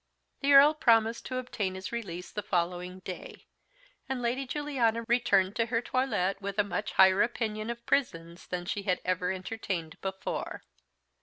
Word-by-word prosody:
The 280 0 +3
Earl 285 +2 +9
promised 230 -5 +3
to 255 - -3
obtain 210 -7 -3
his 190 0 -6
release 185 -7 -5
the 210 - -3
following 180 -1 -2
day, 185 0 -8 0.6
and 265 -1 -1
Lady 245 +3 -1
Juliana 250 -6 0
returned 210 -5 +3
to 230 -1 +1
her 230 0 +1
toilet 235 -7 0
with 200 0 -4
a 205 - +4
much 205 +1 -3
higher 190 +1 +6
opinion 220 -2 -1
of 235 0 -6
prisons 170 -10 -1
than 175 -1 -4
she 200 - -2
had 185 -2 0
ever 180 0 0
entertained 185 -4 -4
before. 190 0 -4
210 Hz, 160 wpm, -29 LUFS, 185-240 Hz, 0.6 s, Earl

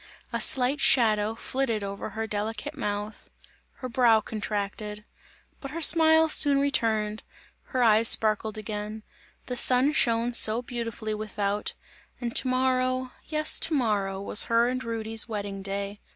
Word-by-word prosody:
A - - -1
slight 265 +3 +4
shadow 220 -5 +2
flitted 230 -3 -3
over 200 +1 -6
her 220 +2 -5
delicate 220 +6 -5
mouth, 210 -4 -5 0.5
her 255 - -4
brow 235 -2 +3
contracted; 210 -1 -5 0.5
but 275 - -8
her 320 +4 -6
smile 320 -1 +5
soon 285 -2 +4
returned; 220 -6 0 0.4
her 255 -2 -1
eyes 225 0 +4
sparkled 215 0 +2
again; 215 0 -6 0.4
the 250 - -5
sun 255 +4 +2
shone 235 -3 +1
so 230 +1 +5
beautifully 230 -3 -5
without, 210 -1 -3 0.4
and 235 -2 -5
to - - +3
morrow, 255 0 0 0.2
yes 305 0 +2
to 320 - -1
morrow 205 -7 -1
was 200 +2 +3
her 230 +1 +2
and 255 0 -4
Rudy's 225 -1 0
wedding 200 -2 -5
day. 200 +1 -5
225 Hz, 140 wpm, -26 LUFS, 210-255 Hz, 0.5 s, smile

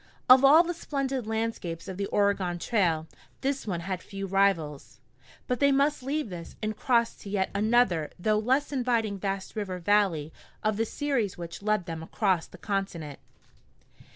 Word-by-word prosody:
Of 255 +1 +8
all 300 +5 +8
the 350 0 -2
splendid 275 -7 -3
landscapes 220 -7 -3
of 190 - -6
the 200 0 -2
Oregon 200 -3 +1
Trail, 170 -5 +1 0.4
this 275 -3 -2
one 175 -4 -2
had 185 0 -4
few 195 +1 -6
rivals. 185 -9 0 0.5
But 250 - -1
they 280 0 +4
must 280 +2 +2
leave 275 -3 -2
this 170 -2 -8
and 215 0 -3
cross 235 0 +2
to 200 - -10
yet 195 -1 0
another 205 -6 +2
though 210 +4 +1
less 260 +7 +1
inviting 235 -6 0
vast 195 +1 -3
river 195 -4 -3
valley 180 -5 +1 0.3
of 215 -1 +1
the 225 - +1
series 255 -6 -1
which 170 +1 -7
led 210 -3 0
them 165 -1 -5
across 185 0 0
the - - -14
continent. 185 -8 -3
205 Hz, 165 wpm, -28 LUFS, 180-245 Hz, 0.5 s, Of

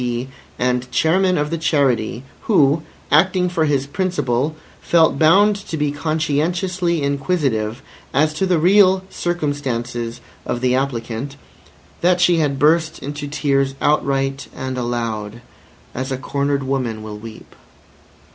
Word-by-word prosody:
P. 120 +1 -3 0.3
and 125 0 0
Chairman 185 +5 +2
of 150 +1 -1
the 165 - -2
Charity, 135 -7 +1 0.2
who, 150 -7 +4 0.3
acting 180 +4 +3
for 165 -3 +1
his 140 -3 +1
principal, 145 -4 -1 0.3
felt 160 -5 +3
bound 195 +7 +5
to 160 - -3
be 150 -1 0
conscientiously 160 +3 -1
inquisitive 135 -6 -1 0.3
as 155 +2 +2
to 190 +5 -1
the 180 -2 +3
real 190 +2 +5
circumstances 125 -8 -3 0.2
of 120 - -3
the 125 -1 +2
applicant, 130 0 -2 0.7
that 180 +1 +3
she 175 -1 +4
had 145 -4 +1
burst 160 +2 +2
into 145 +1 -6
tears 140 -1 0
outright 135 -2 0
and 130 0 -4
aloud, 115 -3 -3 0.5
as 130 +2 -4
a 130 - -1
cornered 140 +1 -1
woman 125 -5 -2
will 105 -1 -7
weep. 110 0 -11
145 Hz, 130 wpm, -20 LUFS, 125-165 Hz, 0.7 s, bound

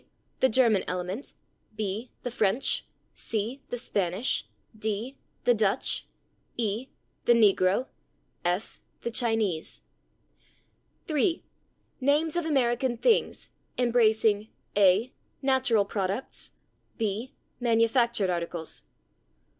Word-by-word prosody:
The 260 - +4
German 225 -5 +4
element. 180 +7 -3 0.4
b. 215 +3 -3
The 245 - -3
French. 220 +2 +1 0.3
c. 230 +5 -3
The 245 - -3
Spanish. 200 -1 -1 0.3
d. 220 +4 -3 0.3
The 245 - +5
Dutch. 215 +1 0 0.5
e. 225 +2 -1 0.4
The 240 - +6
negro. 200 0 +4 0.6
f. 180 +4 -2 0.2
The 235 - -3
Chinese. 225 -9 0 1.2
3. 320 +3 +1 0.6
Names 295 +4 +2
of 345 -2 0
American 250 -3 +1
things, 450 - +1 0.3
embracing: 220 -3 +3 0.3
a. 205 +5 +4 0.3
Natural 260 -6 +3
products. 200 +4 -3 0.4
b. 220 +3 -2 0.2
Manufactured 230 -3 +2
articles. 170 -2 -4
225 Hz, 90 wpm, -28 LUFS, 200-255 Hz, 1.2 s, The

